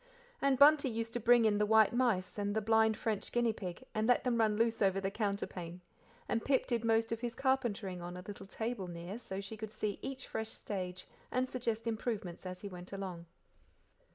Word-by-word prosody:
And 275 -1 +3
Bunty 285 0 +7
used 230 0 -3
to 240 - -1
bring 240 0 +5
in 210 -1 +3
the 210 - +3
white 220 0 +5
mice 225 -6 +1
and 205 0 -1
the - - +3
blind 220 0 +3
French 215 -3 -2
guinea 240 -2 +2
pig, 185 +2 -6
and 215 +1 0
let 245 - +4
them 245 -2 +1
run 215 -2 +3
loose 230 0 +1
over 195 -1 +3
the 195 0 -2
counterpane, 195 -5 -3 0.5
and 230 - 0
Pip 270 -2 +2
did 235 -3 -1
most 225 0 +2
of 230 - -1
his 240 -1 -3
carpentering 235 -9 0
on 175 +1 -6
a 180 - -8
little 205 -1 -8
table 220 -1 -3
near, 175 +5 -6
so 190 -5 -5
she 200 +2 -6
could 220 0 -5
see 210 -1 -3
each 265 -1 -5
fresh 220 0 -3
stage 185 -3 -5 0.2
and 255 +1 +1
suggest 230 -3 -2
improvements 215 -6 -3
as 180 0 -7
he 205 - -5
went 180 -2 -9
along. 185 -4 -6
220 Hz, 210 wpm, -34 LUFS, 195-235 Hz, 0.5 s, Bunty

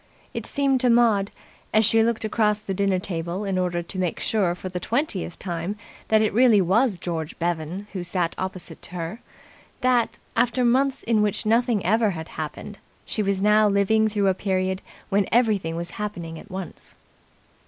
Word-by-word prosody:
It - - -5
seemed 275 -2 +1
to 250 - +3
Maud, 225 -4 +4 0.4
as 220 0 +4
she 225 +2 +4
looked 225 -1 0
across 215 -1 +2
the 210 -2 -5
dinner 195 0 +1
table 180 +1 -3
in 190 -2 0
order 175 -1 -1
to 185 +2 -6
make 180 -3 -1
sure 190 -6 +1
for 185 - -7
the 180 -1 -4
twentieth 215 - -2
time 175 +2 -4 0.3
that 220 0 +4
it 215 - 0
really 235 -2 +5
was 200 +5 +3
George 165 -3 -4
Bevan 175 +3 -2
who 185 -3 -3
sat 175 -1 -1
opposite 185 -3 -6
her, 175 +4 -5 0.6
that, 250 -2 +2 0.2
after 245 +1 +2
months 265 +3 +2
in 225 -2 +2
which 210 +1 0
nothing 235 +1 +3
whatever 220 +4 +2
had 160 -4 -5
happened, - - -6 0.3
she 215 - -1
was 195 -1 0
now 210 0 +5
living 205 +2 +3
through 205 -2 +1
a 190 - +4
period 190 0 -1 0.3
when 200 -1 +2
everything 210 -9 +2
was 170 +1 -4
happening 170 -6 -5
at 215 - -14
once. 190 -2 -8
200 Hz, 175 wpm, -24 LUFS, 180-220 Hz, 0.6 s, really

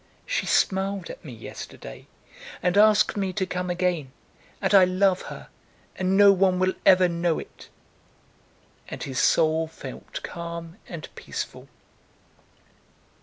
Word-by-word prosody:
She - - -2
smiled 195 -1 +1
at - - -12
me 150 - -9
yesterday 110 - -10 0.6
and 180 0 +1
asked 215 0 +5
me 195 -2 -1
to 190 -1 -1
come 180 0 -3
again, 175 -6 -1 0.5
and 195 0 0
I 195 -2 +8
love 185 +1 +2
her, - - -10 0.5
and 190 +1 0
no 200 0 +8
one 190 -1 +2
will 185 +1 +1
ever 185 -1 +7
know 170 -1 0
it." - - -10 1.2
And - - -7
his 130 -2 -3
soul 160 0 +3
felt 135 -4 -9
calm 170 +1 -7
and 170 -4 -7
peaceful. - - -7
180 Hz, 130 wpm, -25 LUFS, 170-195 Hz, 1.2 s, I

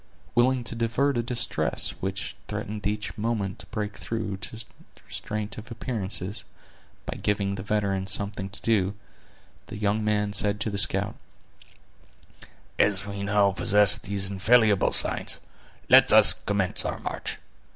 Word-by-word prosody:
Willing 125 +1 +2
to 115 - -1
divert 120 +5 0
a 120 - +1
distress 120 0 +1
which 95 0 -4
threatened 105 -1 -4
each 105 0 -4
moment 105 -3 -2
to - - -8
break 105 -1 -5
through 110 -4 -4
the 110 +4 -7 0.4
restraint 105 0 -4
of 110 +3 -12
appearances, 105 -4 -4 0.6
by - - -5
giving 100 -1 0
the 100 - -5
veteran 100 -1 -1
something 100 0 -2
to 100 - -11
do, 105 -3 +1 0.7
the - - -8
young 105 +1 0
man 105 -1 0
said 105 +1 0
to 110 - -1
the 100 - -1
scout: - - +2 1.7
"As 100 -1 +2
we 100 -1 -6
now 100 0 +2
possess 105 +1 +5
these 100 -1 -1
infallible 105 +1 +3
signs, - - +2 0.5
let - - +7
us - - +8
commence 100 -3 -1
our - - -3
march. - - -5
105 Hz, 140 wpm, -26 LUFS, 100-110 Hz, 1.7 s, us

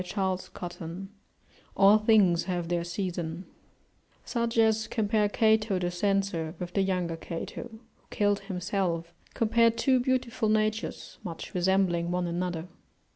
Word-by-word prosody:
CHAPTER 190 0 -2
XXVIII 175 +1 -6 0.7
ALL 200 +2 +7
THINGS 205 -6 +4
HAVE 175 -2 -2
THEIR 175 -1 0
SEASON 175 -1 -4 0.8
Such 235 -1 -1
as 220 -1 +3
compare 210 -1 +1
Cato 220 -2 +3
the 175 -1 -1
Censor 185 -3 0
with 175 0 -6
the 195 - +2
younger 180 -3 0
Cato, 165 +8 -6
who 220 -1 -13 0.3
killed 205 -1 +1
himself, 180 -3 -2 0.2
compare 230 +1 +4
two 250 +3 +2
beautiful 250 -3 0
natures, 215 0 -1
much 170 -5 -7
resembling 180 -2 +2
one 180 0 0
another. 175 -1 -3
190 Hz, 130 wpm, -28 LUFS, 175-215 Hz, 0.8 s, ALL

